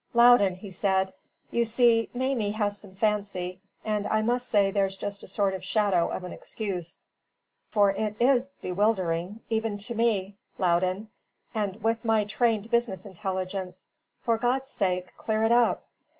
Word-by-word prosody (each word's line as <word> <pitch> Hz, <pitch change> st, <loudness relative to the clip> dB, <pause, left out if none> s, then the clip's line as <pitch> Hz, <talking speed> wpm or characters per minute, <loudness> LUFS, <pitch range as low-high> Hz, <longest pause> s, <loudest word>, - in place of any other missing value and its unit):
"Loudon," 235 Hz, -6 st, +6 dB
he 190 Hz, +1 st, -10 dB
said, 190 Hz, 0 st, +1 dB, 0.4 s
"you 235 Hz, -, +2 dB
see 230 Hz, 0 st, +3 dB
Mamie 250 Hz, -4 st, 0 dB
has 205 Hz, -2 st, 0 dB
some 190 Hz, -2 st, -14 dB
fancy; 195 Hz, -3 st, -1 dB, 0.2 s
and 210 Hz, -1 st, 0 dB
I 215 Hz, 0 st, +1 dB
must 245 Hz, +2 st, 0 dB
say 200 Hz, -4 st, +3 dB
there's 195 Hz, -1 st, +1 dB
just 200 Hz, 0 st, -5 dB
a -, -, -9 dB
sort 200 Hz, -2 st, +1 dB
of 190 Hz, -, -3 dB
a -, -, -17 dB
shadow 195 Hz, -3 st, +2 dB
of -, -, -4 dB
an 180 Hz, -, -6 dB
excuse; 180 Hz, -6 st, -5 dB, 0.7 s
for 205 Hz, -2 st, +4 dB
it 210 Hz, +1 st, -2 dB
IS 255 Hz, +1 st, +4 dB, 0.2 s
bewildering 185 Hz, 0 st, 0 dB
even 220 Hz, -2 st, 0 dB
to 205 Hz, +4 st, -6 dB
me, 215 Hz, -4 st, +1 dB, 0.2 s
Loudon, 185 Hz, +3 st, +1 dB, 0.4 s
with 220 Hz, +2 st, -1 dB
my 225 Hz, -2 st, +3 dB
trained 220 Hz, +1 st, 0 dB
business 235 Hz, -4 st, 0 dB
intelligence. 185 Hz, -1 st, -4 dB, 0.4 s
For 230 Hz, -1 st, +1 dB
God's 260 Hz, +3 st, 0 dB
sake, 185 Hz, -2 st, -1 dB
clear 220 Hz, 0 st, 0 dB
it 225 Hz, -, +3 dB
up." 240 Hz, -1 st, +3 dB
205 Hz, 155 wpm, -27 LUFS, 190-225 Hz, 0.7 s, Loudon